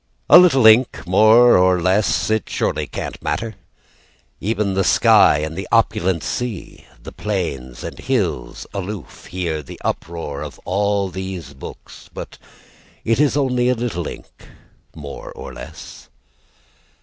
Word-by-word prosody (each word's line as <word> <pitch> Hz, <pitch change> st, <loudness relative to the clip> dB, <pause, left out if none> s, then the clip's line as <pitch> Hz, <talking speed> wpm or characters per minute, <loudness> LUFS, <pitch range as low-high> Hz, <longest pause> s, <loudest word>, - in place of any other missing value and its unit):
A -, -, +11 dB
little 150 Hz, -10 st, +5 dB
ink 110 Hz, 0 st, +5 dB
more 110 Hz, +6 st, +6 dB
or 90 Hz, 0 st, +3 dB
less! 95 Hz, +5 st, +1 dB
It 110 Hz, -2 st, -1 dB
surely -, -, -1 dB
can't -, -, -6 dB
matter? 115 Hz, -1 st, -3 dB, 0.9 s
Even 105 Hz, -1 st, -1 dB
the 95 Hz, 0 st, +1 dB
sky 75 Hz, -, +5 dB
and 80 Hz, +2 st, -4 dB
the 95 Hz, 0 st, -5 dB
opulent 95 Hz, -6 st, +1 dB
sea, 120 Hz, -4 st, -5 dB, 0.2 s
The -, -, -9 dB
plains 70 Hz, -, -4 dB
and -, -, -7 dB
the -, -, -11 dB
hills, -, -, -2 dB
aloof, 100 Hz, -1 st, -7 dB
Hear 85 Hz, -4 st, -3 dB
the 70 Hz, -, -11 dB
uproar 80 Hz, -4 st, -4 dB
of 75 Hz, -2 st, -8 dB
all 100 Hz, +1 st, 0 dB
these 95 Hz, -5 st, -6 dB
books. 65 Hz, -, -12 dB
But -, -, -9 dB, 0.7 s
it 115 Hz, +2 st, +1 dB
is 145 Hz, -1 st, +2 dB
only 125 Hz, -3 st, +1 dB
a 125 Hz, -, +2 dB
little 115 Hz, -9 st, -3 dB
ink -, -, -11 dB, 0.5 s
more 70 Hz, -2 st, -8 dB
or -, -, -9 dB
less. 75 Hz, -2 st, -11 dB
95 Hz, 140 wpm, -20 LUFS, 85-110 Hz, 0.9 s, A